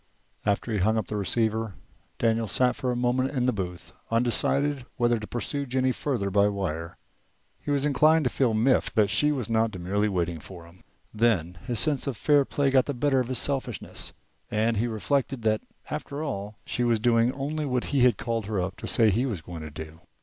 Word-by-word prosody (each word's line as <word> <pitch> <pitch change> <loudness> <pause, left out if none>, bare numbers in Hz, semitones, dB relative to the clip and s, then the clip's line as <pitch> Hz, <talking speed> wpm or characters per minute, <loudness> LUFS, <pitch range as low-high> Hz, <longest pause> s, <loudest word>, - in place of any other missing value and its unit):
After 100 +3 0
he 105 - 0
had - - +1
hung 110 +2 +3
up 110 - -2
the 105 - -3
receiver, 110 +1 0 0.4
Daniel 115 -1 +1
sat 125 +4 +2
for 125 - -1
a - - -1
moment 125 +2 +1
in 125 - +2
the 125 - +2
booth, 90 -3 -5 0.2
undecided 130 +4 +1
whether 120 -2 +2
to 105 - -7
pursue 140 +3 -3
Jennie 130 +1 +1
further 120 -8 -2
by 100 +1 +4
wire. 85 -5 -3 0.6
He - - -8
was 140 -1 +1
inclined 155 +3 +4
to 125 - 0
feel 120 -5 +1
miffed 125 +4 +2
that 105 -2 +3
she 150 +9 +3
was 130 -7 -2
not 115 0 +2
demurely 100 +2 -1
waiting 85 -3 -1
for 85 +2 -11
him. 85 +2 -18 0.3
Then 95 -7 +1
his 120 -4 0
sense 145 0 +1
of 130 -5 -2
fair 145 +2 +4
play 140 0 +1
got 130 -1 +4
the 145 - -2
better 135 +1 +2
of 125 - -1
his 130 0 -2
selfishness, 135 -5 -2 0.4
and 110 +1 +1
he 115 +4 +1
reflected 125 +2 -1
that 110 -1 +2 0.3
after 150 -1 -4
all 105 -7 -4
she 125 - -1
was 120 -2 +2
doing 115 +1 +3
only 145 +2 -3
what 125 -2 0
he 140 - +3
had 125 -4 +5
called 115 -3 -2
her 105 -3 -1
up 90 +1 -3
to - - -6
say 110 -3 +4
he 120 +7 +1
was 100 -10 -4
going 85 -2 -8
to 80 - -6
do. 80 +2 -9
115 Hz, 215 wpm, -27 LUFS, 100-130 Hz, 0.6 s, had